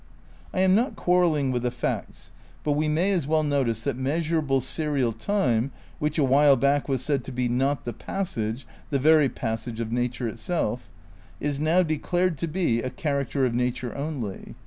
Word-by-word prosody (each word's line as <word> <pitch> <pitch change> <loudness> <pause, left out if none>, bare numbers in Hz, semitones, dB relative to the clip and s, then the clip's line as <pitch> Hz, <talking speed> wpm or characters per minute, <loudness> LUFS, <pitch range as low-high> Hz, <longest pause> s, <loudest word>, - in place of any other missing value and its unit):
I 185 - 0
am 185 0 +5
not 235 +7 +2
quarrelling 170 -7 +2
with 125 -1 -1
the 125 - 0
facts, 120 0 -4 0.3
but 150 - 0
we 150 +2 +1
may 165 +6 +2
as 175 -8 0
well 155 0 +2
notice 130 -7 0
that 140 -3 -1
measurable 150 +1 0
serial 135 -2 -1
time, 125 - +1 0.3
which 150 +1 -1
a 150 - +3
while 140 +1 +5
back 140 +3 +1
was 130 -2 0
said 140 -2 0
to - - -6
be 125 0 -1
"not 130 +3 0
the 120 - -3
passage, 115 - -3 0.2
the 140 - +1
very 150 0 +5
pass 115 -1 -4
age 115 -1 -5
of 115 -1 -3
nature 125 0 -1
itself," 125 -1 -2 0.5
is 145 -1 -2
now 165 +4 +3
declared 170 +1 0
to 170 - -1
be 155 -9 0
"a 130 - -2
char 145 -4 -1
acter 135 +1 0
of 120 - 0
nature 125 0 -1
only. 140 -9 -5
140 Hz, 190 wpm, -26 LUFS, 125-155 Hz, 0.5 s, am